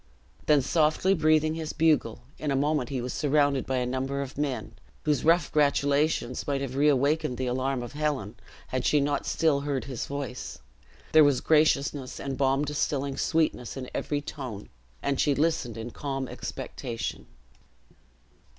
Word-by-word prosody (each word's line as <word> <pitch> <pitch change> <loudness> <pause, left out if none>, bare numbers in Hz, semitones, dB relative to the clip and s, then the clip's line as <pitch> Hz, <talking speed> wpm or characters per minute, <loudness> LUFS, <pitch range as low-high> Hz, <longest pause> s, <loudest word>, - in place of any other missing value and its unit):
Then 150 -3 +5
softly 160 +6 +2
breathing 155 -2 +3
his 160 -1 -4
bugle, 160 -1 +2 0.2
in 150 - -2
a 135 - +1
moment 145 -2 +1
he 130 -3 -2
was 125 - -4
surrounded 145 -2 +2
by 130 - 0
a 125 - 0
number 135 +2 -2
of 135 - -9
men, 140 -3 -2 0.3
whose 150 -3 +1
rough 165 0 +3
gratulations 145 -3 +1
might 140 -1 0
have 135 -2 -4
reawakened 140 -1 +2
the 130 - -2
alarm 130 +1 -1
of 120 - -8
Helen, 145 -8 -2 0.4
had 130 -1 -1
she 150 - +3
not 140 0 -1
still 155 -4 +2
heard 140 -3 -2
his 125 -1 -5
voice. 140 -3 -5 0.5
There 155 0 +8
was 145 -3 +4
graciousness 145 -3 +2
and 135 -1 -3
balm 135 +2 +2
distilling 140 -1 -1
sweetness 155 -7 0
in 130 -1 -6
every 145 -1 -2
tone; 125 -8 -7 0.3
and 140 -1 0
she 145 -2 +3
listened 145 -7 0
in 115 +2 -6
calm 135 -1 -4
expectation. 115 -1 -5
140 Hz, 160 wpm, -27 LUFS, 130-150 Hz, 0.5 s, There